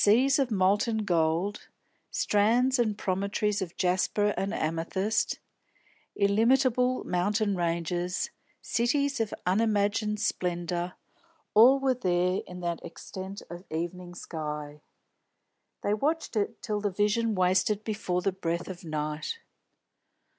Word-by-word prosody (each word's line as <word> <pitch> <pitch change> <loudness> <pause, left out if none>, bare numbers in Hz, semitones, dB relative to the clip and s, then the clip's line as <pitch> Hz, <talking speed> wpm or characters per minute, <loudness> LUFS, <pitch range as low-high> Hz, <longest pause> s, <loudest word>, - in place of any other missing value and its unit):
Seas 260 +7 +5
of 270 -3 +2
molten 210 +2 +2
gold, 170 +3 0 0.4
strands 240 +5 +2
and 215 -3 +1
promontories 200 +2 0
of 175 -2 -5
jasper 190 +3 +1
and 195 +1 -1
amethyst, 190 +4 -1 0.8
illimitable 250 +5 +3
mountain 200 +3 +1
ranges, 175 +1 -1 0.3
cities 280 +3 +1
of 225 -2 0
unimagined 210 +1 +1
splendour, 175 -1 -1 0.6
all 245 +6 +7
were 270 -1 +2
there 180 -5 +1
in 180 0 -8
that 170 -1 -3
extent 190 +3 -8
of 175 +1 -9
evening 175 +2 -4
sky. 150 -3 -6 1.0
They 205 - +1
watched 295 +6 -1
it 215 +2 -1
till 210 -1 -1
the 205 - +1
vision 210 +3 +1
wasted 185 +3 +2
before 185 -5 -2
the 195 - +2
breath 170 -2 -3
of 185 -1 -8
night. 155 - -3
200 Hz, 115 wpm, -28 LUFS, 175-220 Hz, 1.0 s, all